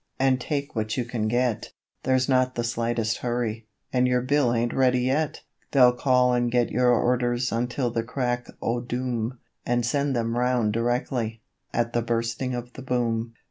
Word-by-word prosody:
and 130 -1 +3
take 140 0 -3
what 110 +1 -2
you 125 - 0
can 115 -3 -2
get, 120 0 0 0.3
'There's 130 -1 +2
not 130 -1 +2
the 120 - -1
slightest 115 -1 -1
hurry, 115 -2 -2 0.3
and 125 0 +3
your 125 0 +2
bill 135 -1 +2
ain't 120 0 0
ready 125 -1 +3
yet.' 140 +4 0 0.3
They'll 125 -3 +7
call 125 0 +3
and 120 -1 +1
get 120 -1 +2
your 125 +2 +3
orders 120 0 +1
until 120 +2 -1
the 115 - 0
crack 120 0 -2 0.2
o' 120 +1 0
doom, 125 -1 -3 0.3
And 120 -1 0
send 140 +2 0
them 115 0 -1
round 125 -4 +1
directly, 115 -1 -1 0.3
at 120 0 -1
the 120 - +2
Bursting 115 +2 -1
of 120 0 -6
the - - -9
Boom. 115 -3 -1
120 Hz, 175 wpm, -25 LUFS, 115-125 Hz, 0.3 s, They'll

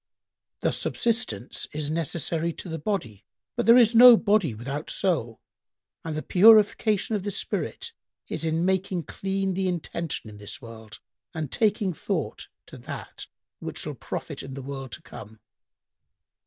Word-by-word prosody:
Thus - - 0
subsistence 230 - -2
is 150 0 -2
necessary 165 +1 -1
to - - -8
the 165 -1 -4
body, 130 - -3 0.3
but - - -1
there 235 +1 +9
is 235 -2 +6
no 240 0 +10
body 200 - +2
without 135 +7 -5
soul; 140 - -1 0.6
and 160 -2 -4
the 155 - -3
purification 215 +1 +5
of 205 - -1
the 205 - -3
spirit 460 - -4 0.3
is 160 - -3
in 165 +1 0
making 190 -2 0
clean 195 +4 -2
the 190 +1 -1
intention 170 -6 -3
in 105 -1 -10
this 105 0 -7
world 110 -3 -11 0.4
and 155 -4 -4
taking 210 -3 +1
thought - - -3 0.2
to - - -12
that - - -8 0.3
which - - -6
shall - - -4
profit - - -6
in 135 0 -8
the 135 - -7
world 135 -1 -6
to - - -8
come. 110 +1 -11
170 Hz, 155 wpm, -26 LUFS, 135-200 Hz, 0.6 s, no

